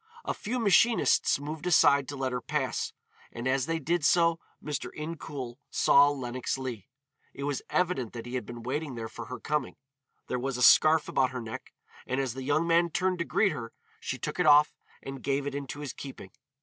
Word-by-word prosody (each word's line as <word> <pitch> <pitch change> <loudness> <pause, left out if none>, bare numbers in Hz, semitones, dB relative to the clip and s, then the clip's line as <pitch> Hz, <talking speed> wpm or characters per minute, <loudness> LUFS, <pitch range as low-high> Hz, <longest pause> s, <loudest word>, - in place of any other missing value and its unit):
A - - -1
few 240 +5 -4
machinists 225 - +3
moved 150 +3 -5
aside 140 -5 +5
to 145 - -5
let 135 -1 -2
her 125 0 -3
pass, 135 -5 -2 0.4
and 120 +2 -5
as 130 0 +1
they 165 0 0
did 160 +2 -1
so 165 +1 +4 0.2
Mr. 150 -2 -4
Incoul 150 -6 -6
saw 140 +1 +5
Lenox 130 -2 -3
Leigh. 125 -7 -6 0.5
It 140 - -6
was 145 -1 -2
evident 175 -11 0
that 115 -1 -7
he 120 - -8
had 125 - -2
been 120 -1 -9
waiting 140 +2 -3
there 115 -1 -5
for - - -8
her 125 - -7
coming. 150 -3 -2 0.5
There 125 - -2
was 135 0 -2
a 125 - 0
scarf 155 +3 +6
about 130 -1 +2
her 130 -1 -5
neck, 110 -1 -8 0.4
and 130 - -1
as 135 -4 -1
the 130 - -6
young 145 +5 +1
man 170 0 +3
turned 185 +2 0
to 170 - -1
greet 200 +3 +2
her, 115 -1 -6 0.3
she - - -4
took - - -5
it 180 - +3
off 150 0 +6 0.3
and 135 -1 -7
gave 140 0 -1
it 145 - -3
into 140 0 -5
his 145 - -5
keeping. 130 -8 -9
140 Hz, 205 wpm, -29 LUFS, 130-160 Hz, 0.5 s, scarf